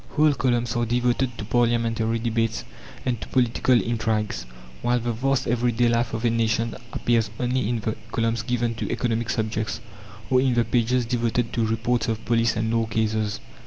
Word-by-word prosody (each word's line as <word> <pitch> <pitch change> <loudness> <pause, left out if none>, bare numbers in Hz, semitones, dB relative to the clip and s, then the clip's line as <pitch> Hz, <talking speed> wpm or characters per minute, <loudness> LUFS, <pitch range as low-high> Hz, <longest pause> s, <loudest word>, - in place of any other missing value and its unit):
Whole 150 -1 +4
columns 120 -3 0
are 120 - +1
devoted 120 +1 0
to 105 - -5
parliamentary 115 0 +1
debates 115 -1 -1 0.4
and 120 -4 -1
to - - -6
political 125 0 +3
intrigues; 110 - -1 0.3
while 120 +1 +2
the 120 0 -2
vast 135 +3 0
everyday 120 0 +2
life 115 0 +1
of 115 +2 -3
a 115 - +3
nation 115 0 0 0.2
appears 115 -2 +1
only 125 -2 0
in 120 -2 -1
the 110 +1 -2 0.2
columns 115 -1 0
given 120 -1 -1
to - - -2
economic 115 -1 -1
subjects, 110 -2 -1 0.5
or 130 0 +5
in 130 -2 +2
the 120 -1 +3
pages 120 +1 +1
devoted 120 -1 0
to 115 -2 +1
reports 115 +2 0
of 110 -1 -2
police 115 -1 +2
and 110 +1 0
law 115 -1 +1
cases. 110 -1 0
115 Hz, 175 wpm, -24 LUFS, 115-120 Hz, 0.5 s, or